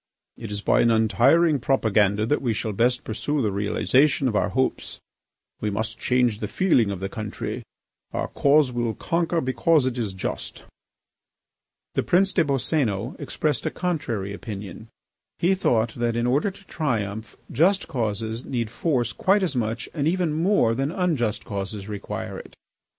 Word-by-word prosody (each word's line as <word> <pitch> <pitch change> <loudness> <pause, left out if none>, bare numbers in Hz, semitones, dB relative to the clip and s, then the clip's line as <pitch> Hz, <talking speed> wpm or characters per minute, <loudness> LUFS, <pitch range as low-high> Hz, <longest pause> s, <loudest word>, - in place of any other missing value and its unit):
It 115 - -8
is 105 0 -4
by - - +3
an 115 - +4
untiring 135 +8 +4
propaganda 110 -5 +2
that 150 +6 +1
we 120 -4 0
shall 110 0 -3
best 125 +4 +1
pursue 130 +6 -1
the 105 - +1
realisation 130 +8 +2
of 115 - -1
our 105 - +2
hopes. 130 +6 -1 0.6
We 105 - -1
must 110 +2 -3
change 125 -4 +1
the 105 - -3
feeling 125 - +2
of 100 -2 -4
the 95 - -1
country. 105 0 -5 0.5
Our - - -2
cause 140 -1 +3
will 120 -2 -1
conquer 170 0 0
because 130 +4 +2
it 130 -1 -1
is 105 -5 -2
just." 95 - -5 1.3
The - - +1
Prince 195 +2 +2
des 170 - +3
Boscénos 130 -5 0
expressed 150 -5 -1
a - - +2
contrary 120 - -2
opinion. 105 0 -7 0.5
He 180 +3 +3
thought 120 - +1
that, 120 -1 -1
in 120 0 0
order 140 +10 +2
to 195 0 -14
triumph, 110 - -3
just 185 +9 +3
causes 110 -1 -2
need 115 -4 -3
force 120 -2 0
quite 195 +1 +2
as 165 -7 -1
much 115 -1 -2
and 150 -2 0
even 175 -2 +1
more 165 - +3
than 135 +5 -1
unjust 155 - -1
causes 100 -1 -5
require 105 -2 -5
it. - - -13
120 Hz, 160 wpm, -24 LUFS, 110-150 Hz, 1.3 s, an